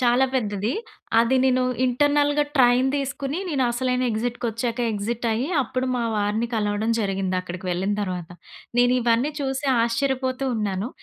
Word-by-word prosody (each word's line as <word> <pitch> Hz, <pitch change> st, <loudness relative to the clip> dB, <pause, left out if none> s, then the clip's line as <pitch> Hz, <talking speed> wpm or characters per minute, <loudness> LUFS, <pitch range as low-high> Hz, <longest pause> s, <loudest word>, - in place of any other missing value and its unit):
చాలా 245 Hz, +1 st, +4 dB
పెద్దది. 210 Hz, -2 st, -1 dB, 0.5 s
అది 245 Hz, +3 st, +3 dB
నేను 255 Hz, -1 st, +3 dB, 0.2 s
ఇంటర్నల్‌గా 290 Hz, +3 st, +2 dB
ట్రైన్ 250 Hz, +1 st, +5 dB
తీసుకొని 275 Hz, +3 st, -3 dB
నేను 275 Hz, -4 st, +1 dB
అసలైన 250 Hz, +1 st, 0 dB
ఎక్సిట్‌‌ 235 Hz, +2 st, -2 dB
కొచ్చాకే 235 Hz, +1 st, -1 dB
ఎక్సిట్ 225 Hz, +3 st, -3 dB
అయ్యి, 240 Hz, +6 st, -1 dB
అప్పుడు 255 Hz, +2 st, -2 dB
మా 240 Hz, -, -1 dB
వారిని 210 Hz, +3 st, 0 dB
కలవడం 210 Hz, +1 st, 0 dB
జరిగింది 195 Hz, -2 st, -1 dB
అక్కడికి 185 Hz, 0 st, -7 dB
వెళ్ళిన 190 Hz, +3 st, 0 dB
తర్వాత. 180 Hz, -3 st, -4 dB, 0.5 s
నేను 245 Hz, 0 st, +5 dB
ఇవన్నీ 240 Hz, +5 st, +2 dB
చూసి 270 Hz, 0 st, -2 dB, 0.2 s
ఆశ్చర్యపోతూ 260 Hz, +2 st, -1 dB
ఉన్నాను. 205 Hz, 0 st, -2 dB
240 Hz, 140 wpm, -24 LUFS, 210-260 Hz, 0.5 s, ట్రైన్